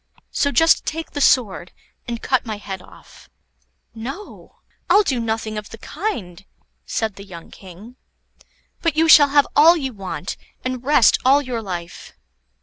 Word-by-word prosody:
So 285 - 0
just 325 +2 +4
take 325 +1 -4
the 290 - -4
sword, 205 -10 +2 0.4
and 235 -1 -5
cut 260 -2 +1
my 220 -3 -5
head 195 -2 -7
off." - - -18 0.6
"No, 270 - -9 0.3
I'll 405 +4 +5
do 265 -10 -1
nothing 220 -1 -3
of 210 - -12
the 225 - -10
kind," 220 - -5 0.4
said 220 -3 -3
the 200 - -9
young 175 -4 -12
King; 200 +7 -14 0.8
"but 330 -4 0
you 325 +1 +3
shall 290 -2 +8
have 285 0 +4
all 325 +4 +7
you 265 -5 -4
want, 190 -2 -6 0.3
and 255 -1 -3
rest 280 -4 +4
all 270 +3 +5
your 245 -3 -4
life." 175 -4 -7
240 Hz, 155 wpm, -20 LUFS, 205-290 Hz, 0.8 s, shall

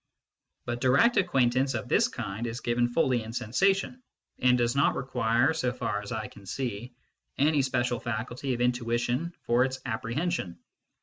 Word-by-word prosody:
But 120 0 -3
direct 140 - +4
ac 190 - +3
quaintance 130 -3 +2
of 110 - -6
this - - +3
kind 110 +5 -5
is 115 +1 -4
given 120 0 +1
fully 125 -1 +1
in 110 0 -7
sensation, 190 - 0 0.4
and 125 0 +4
does 120 +1 +1
not 140 - +3
require, 125 +2 +1
so 130 -6 0
far 105 -4 -3
as 100 - -9
I 110 -3 -3
can 100 -1 -15
see, 120 0 -4 0.4
any 150 +1 +3
special 120 -2 0
faculty 120 +3 -3
of 120 - -4
intuition 120 +5 0
for 120 +2 +3
its 130 0 -2
apprehension. 120 - -2
125 Hz, 165 wpm, -28 LUFS, 120-135 Hz, 0.4 s, direct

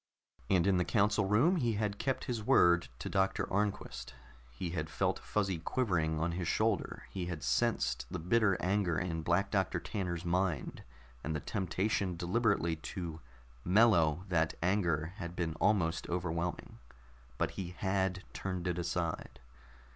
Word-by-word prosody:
And 90 -3 +4
in 95 -2 +3
the 90 - +3
council 105 +3 +2
room 125 - +4
he 120 -7 +1
had 105 -1 -2
kept 135 -1 -1
his 120 -3 -3
word 85 -4 +4
to - - -6
Doctor 95 0 +1
Arnquist. 95 -12 -2 0.3
He 70 +8 -5
had 80 -2 -3
felt - - 0
Fuzzy 95 -5 -1
quivering 80 -6 0
on 85 +2 0
his 85 0 -3
shoulder; 110 +1 0
he 90 -2 -3
had 85 -4 -5
sensed - - +1
the - - -3
bitter 100 +2 +2
anger 95 -3 +1
in 80 -2 -2
Black 85 +4 +1
Doctor 95 -4 +1
Tanner's 90 -4 -3
mind, 90 -4 -1 0.4
and 80 +2 -2
the - - -1
temptation 95 +2 -1
deliberately 90 -2 +1
to 80 0 -6 0.4
mellow 90 -5 +4
that 80 -3 +1
anger 85 -4 +1
had 85 -4 -6
been 85 -3 -1
almost 85 -6 +2
overwhelming, 85 -5 -3 0.6
but - - 0
he 90 -2 -6
had 95 -1 0
turned 95 -2 -4
it 90 0 -1
aside. 85 -4 -3
90 Hz, 150 wpm, -33 LUFS, 85-100 Hz, 0.6 s, And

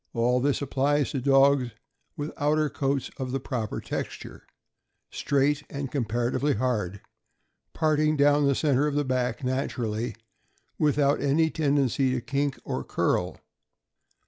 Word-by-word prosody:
All 120 +2 +2
this 140 +2 0
applies 140 +1 +1
to 135 - -2
dogs 135 -1 +4 0.5
with 145 +1 -4
outer 150 +1 +1
coats 135 -2 -1
of 130 -2 -4
the 135 - -1
proper 120 -4 -3
texture; - - -6 0.6
straight 140 +1 +1
and 140 -2 -5
comparatively 120 +3 0
hard, 105 -5 -1 0.7
parting 155 -1 +2
down 145 0 +4
the 140 - +2
center 145 -1 +2
of 145 - -2
the 145 0 +1
back 130 +1 -1
naturally, 120 -3 -2 0.6
without 145 -1 +2
any 155 +3 +2
tendency 140 -4 +1
to 125 - -1
kink 140 +2 -2
or - - -3
curl. - - -1
140 Hz, 130 wpm, -26 LUFS, 125-145 Hz, 0.7 s, dogs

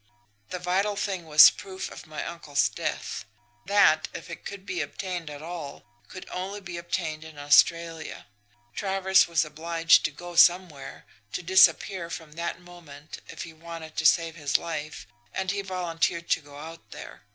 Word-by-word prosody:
"The - - -4
vital 190 +4 0
thing 190 -4 -3
was 150 -1 +9
proof 190 -2 -7
of - - -11
my 155 - -5
uncle's 155 -4 0
death. - - -4 0.4
That, 200 -6 +4
if - - -8
it 165 - -9
could 200 -1 -8
be 180 -4 -3
obtained 175 +2 -5
at 145 0 -9
all, 165 -4 -7 0.2
could 185 - -10
only 190 +3 -4
be 175 -3 -8
obtained 160 -2 -3
in 160 -2 -12
Australia. 165 +3 +2 0.5
Travers 190 -1 +3
was 170 -1 +1
obliged 165 +2 +3
to - - 0
go 175 +3 -10
somewhere, 175 -5 +3 0.3
to - - -3
disappear 185 0 +4
from 160 -2 -7
that 170 +2 -4
moment 165 -4 -12
if - - -7
he 165 - -10
wanted 165 -1 -9
to 160 - +5
save 165 -1 +3
his 145 -3 +1
life, 155 -3 -6 0.3
and 190 0 -1
he 200 0 -2
volunteered 170 -3 -2
to - - +3
go 145 -1 -14
out 165 +2 -10
there. - - -10
170 Hz, 165 wpm, -26 LUFS, 155-185 Hz, 0.5 s, was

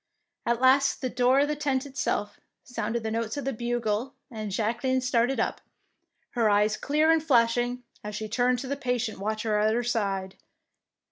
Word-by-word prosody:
At 235 0 +1
last, 265 +2 +4
at - - -22
the 255 -2 -3
door 255 +2 +4
of 290 - +2
the 300 - -1
tent 280 -2 -1
itself, 260 -7 -2 0.2
sounded 235 -3 -3
the 220 - -2
notes 225 +2 -2
of 285 - -4
the 270 - -1
bugle, 240 +1 -2 0.2
and 215 -2 -5
Jacqueline 235 +6 0
started 250 +1 +1
up, - - -1 0.7
her 230 -3 +2
eyes 210 +1 +3
clear 305 +3 +2
and 325 -1 +3
flashing, 245 -2 +2 0.2
as 210 0 -5
she 215 +1 -4
turned 245 +3 +1
to 260 - -5
the 280 - -1
patient 245 -6 -2
watcher 215 +1 -1
at 215 +1 +2
her 240 - 0
side. 195 -5 -2
240 Hz, 185 wpm, -27 LUFS, 215-260 Hz, 0.7 s, last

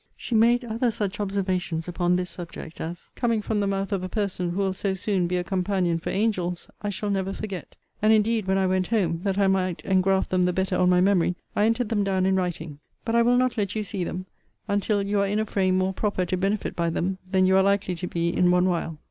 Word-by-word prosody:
She - - -5
made 235 +2 +4
other 235 +2 0
such 205 -2 -3
observations 185 -5 -1
upon 175 0 +1
this 180 0 -2
subject 170 -2 -8
as, 170 +2 -7
coming 230 -3 +1
from 210 0 -1
the 200 - +1
mouth 195 +1 -2
of 195 -2 0
a 185 - -4
person 190 -4 -2
who 175 - -4
will 195 -1 +1
so 195 0 -2
soon 190 -2 0
be 180 +1 0
a 180 - -1
companion 180 -2 0
for 165 - -5
angels, 185 -4 -1
I 205 - -2
shall 205 +1 -3
never 195 0 -1
forget. 195 -4 -6 0.3
And 215 +1 +4
indeed, 220 -1 +2
when 190 0 +2
I 190 - +2
went 185 -1 +1
home, 180 -8 +1
that 195 -1 0
I 200 - +3
might 185 -2 +1
engraft 190 0 +2
them 185 -1 +2
the 180 0 +2
better 190 0 0
on 180 0 +3
my 180 0 +4
memory, 185 -2 +3 0.2
I 205 - +3
entered 230 0 +1
them 205 -3 +1
down 190 -1 +1
in 190 0 +3
writing: 165 -5 -3 0.3
but 225 - -1
I 235 - +5
will 245 +1 +4
not 255 -2 +1
let 200 0 -1
you 215 - -1
see 200 -3 -3
them 185 +2 -4 0.4
until 205 0 +1
you 200 +1 0
are 200 - +2
in 205 +2 0
a 215 - +1
frame 190 -3 +1
more 190 +1 +1
proper 195 -2 -1
to 180 - -1
benefit 195 +3 -1
by 170 -1 0
them 185 +3 -2
than 185 -1 +3
you 190 0 +4
are 190 - +6
likely 200 -1 +1
to 180 - -4
be 170 -1 -1
in 180 +1 +2
one 180 0 +4
while. 170 -3 -1
190 Hz, 250 wpm, -25 LUFS, 180-205 Hz, 0.4 s, are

